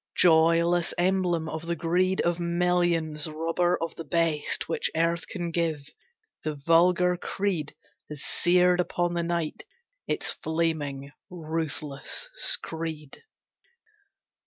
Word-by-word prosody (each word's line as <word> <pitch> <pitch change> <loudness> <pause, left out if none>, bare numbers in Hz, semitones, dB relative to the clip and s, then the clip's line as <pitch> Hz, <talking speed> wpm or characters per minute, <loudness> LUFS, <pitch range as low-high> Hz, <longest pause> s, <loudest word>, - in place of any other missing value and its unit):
Joyless 170 0 +4
emblem 175 -2 +1
of 160 0 -5
the 170 - 0
greed 180 +3 +1
Of 175 0 0
millions, 170 -3 +1
robber 165 +3 0
of 165 -1 -3
the 165 - -7
best 165 -1 0
Which 165 - -1
earth 165 +1 0
can 175 -3 -4
give, 160 -4 -2 0.5
the 155 -1 -2
vulgar 175 +4 +3
creed 180 -5 -2 0.3
Has 150 -2 -7
seared 180 0 +3
upon 175 0 0
the 170 - 0
night 170 -2 -2 0.5
its - - -1
flaming 155 -4 -2 0.2
ruthless 160 - -4
screed. 160 - -1
165 Hz, 110 wpm, -27 LUFS, 160-175 Hz, 0.5 s, Joyless